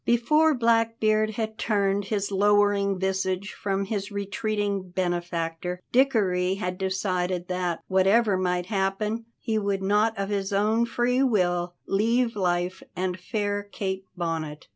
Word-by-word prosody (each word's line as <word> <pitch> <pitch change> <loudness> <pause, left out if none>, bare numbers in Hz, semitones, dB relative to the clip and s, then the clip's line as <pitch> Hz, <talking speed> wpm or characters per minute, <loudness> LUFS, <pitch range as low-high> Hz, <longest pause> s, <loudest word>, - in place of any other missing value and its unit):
Before 300 +7 +3
Blackbeard 225 -2 +2
had 220 -1 -3
turned 200 -2 +1
his 200 -1 -2
lowering 205 0 +3
visage 190 +1 -1
from 195 -1 -2
his 205 0 -3
retreating 200 -1 -2
benefactor, 175 -1 -2
Dickory 195 -8 +2
had 180 -2 -4
decided 185 -2 -1
that, 180 -2 -2
whatever 195 +3 +3
might 180 -1 0
happen, 210 +3 -1
he 220 -2 -1
would 200 -2 -1
not 210 +3 +2
of 195 0 -2
his 200 -1 -2
own 215 +4 +2
free 245 +2 +1
will 175 -8 +1
leave 230 +4 +1
life 180 -1 -1
and 185 0 -2
fair 205 +1 -2
Kate 195 -1 -4
Bonnet. 160 -3 -4
200 Hz, 130 wpm, -26 LUFS, 185-215 Hz, -, Before